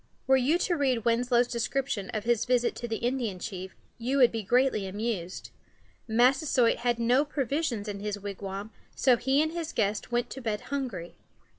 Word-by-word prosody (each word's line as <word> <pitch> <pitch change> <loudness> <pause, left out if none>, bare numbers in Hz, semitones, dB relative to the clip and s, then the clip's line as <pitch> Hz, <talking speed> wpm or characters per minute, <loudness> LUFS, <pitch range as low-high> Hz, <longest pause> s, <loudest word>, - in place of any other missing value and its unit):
Were 265 - +5
you 265 +6 +3
to 350 0 0
read 260 -7 0
Winslow's 240 +1 +3
description 245 -3 -2
of 215 -2 -3
his 235 -1 +1
visit 245 -1 +2
to 240 - -4
the 225 - -2
Indian 235 -4 -1
chief, 190 -1 -6 0.2
you 255 +4 0
would 250 -3 +6
be 225 - -3
greatly 240 -1 +2
amused. 195 -3 -4 0.6
Massasoit 250 +2 +3
had 240 -1 0
no 245 +4 +3
provisions 275 -5 -2
in 205 -1 -4
his 205 0 -3
wigwam, 200 +1 -6 0.2
so 255 -2 +4
he 270 +5 +2
and 315 - -2
his 330 -1 -4
guests 210 +2 -1
went 240 0 0
to 265 - -6
bed 215 -3 -2
hungry. 245 -12 -4
240 Hz, 175 wpm, -28 LUFS, 210-265 Hz, 0.6 s, would